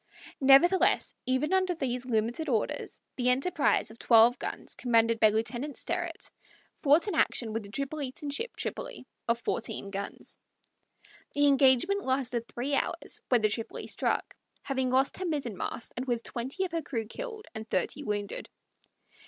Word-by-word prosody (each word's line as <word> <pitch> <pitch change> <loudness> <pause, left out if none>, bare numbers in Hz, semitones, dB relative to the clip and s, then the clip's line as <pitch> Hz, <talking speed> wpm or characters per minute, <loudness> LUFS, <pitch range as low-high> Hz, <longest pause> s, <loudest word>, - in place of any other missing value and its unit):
Nevertheless, 285 +8 +5
even 260 +7 +1
under 370 -1 +2
these 250 -4 -2
limited 235 +6 0
orders, 225 -5 -1 0.2
the 250 -1 +2
Enterprise, 275 0 +2
of 225 - -15
twelve 235 +1 +6
guns, - - -5
commanded 230 -2 +2
by 215 - +7
Lieutenant 240 +6 -2
Sterrett, - - -4 0.5
fought 305 +6 +5
an 405 - -1
action 230 -7 +1
with 225 - -1
the 200 - -11
Tripolitan 280 +3 -4
ship 465 +10 -3
Tripoli, - - -5 0.2
of 235 0 +2
fourteen 200 -4 -3
guns. 200 0 -5 1.0
The 290 0 +4
engagement 280 +8 +4
lasted 250 -3 -1
three 265 +4 -3
hours, - - -1
when 245 -4 +3
the 215 - +5
Tripoli 225 +2 -4
struck, - - 0 0.3
having 265 -2 -1
lost 260 +2 +2
her 375 - -3
mizzenmast, 245 - -3
and 255 +2 -4
with 235 -2 -1
twenty 265 +11 -3
of 360 - -6
her 330 0 -1
crew 235 -7 -3
killed 440 - -7
and 220 -1 -7
thirty 185 +10 -1
wounded. 205 -4 -3
260 Hz, 155 wpm, -29 LUFS, 230-295 Hz, 1.0 s, by